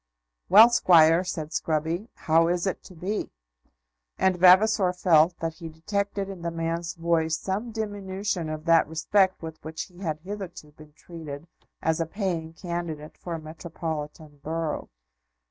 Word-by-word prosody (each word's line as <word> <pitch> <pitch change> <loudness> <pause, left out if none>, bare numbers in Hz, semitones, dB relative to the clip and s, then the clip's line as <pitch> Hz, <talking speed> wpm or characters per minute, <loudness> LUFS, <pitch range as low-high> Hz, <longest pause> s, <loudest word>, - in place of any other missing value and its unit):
"Well, 225 +4 +9
Squire," 165 -5 +5
said 165 -4 -4
Scruby, 160 +7 -1
"how 165 +1 +3
is 175 +1 0
it 190 - -2
to 185 - -13
be?" 190 +6 -3 0.9
And 190 -1 +2
Vavasor 185 +1 +5
felt 175 -1 +4
that 165 -1 -2
he 165 0 -9
detected 200 +5 -3
in 195 -3 -8
the 170 - -2
man's 165 +1 -3
voice 165 -2 +1
some 195 +7 -3
diminution 200 -5 -3
of 155 0 -6
that 165 -1 +4
respect 185 +4 +1
with 160 -1 -8
which 160 0 -5
he 180 -1 -16
had 155 -5 -3
hitherto 185 -5 -8
been 150 0 -16
treated 160 -3 -9 0.4
as 160 +1 +1
a 165 - -1
paying 170 -4 -3
candidate 170 -3 -5
for 170 -2 -6
a - - -5
metropolitan 155 -2 -7
borough. 160 0 -3
170 Hz, 150 wpm, -26 LUFS, 160-190 Hz, 0.9 s, Well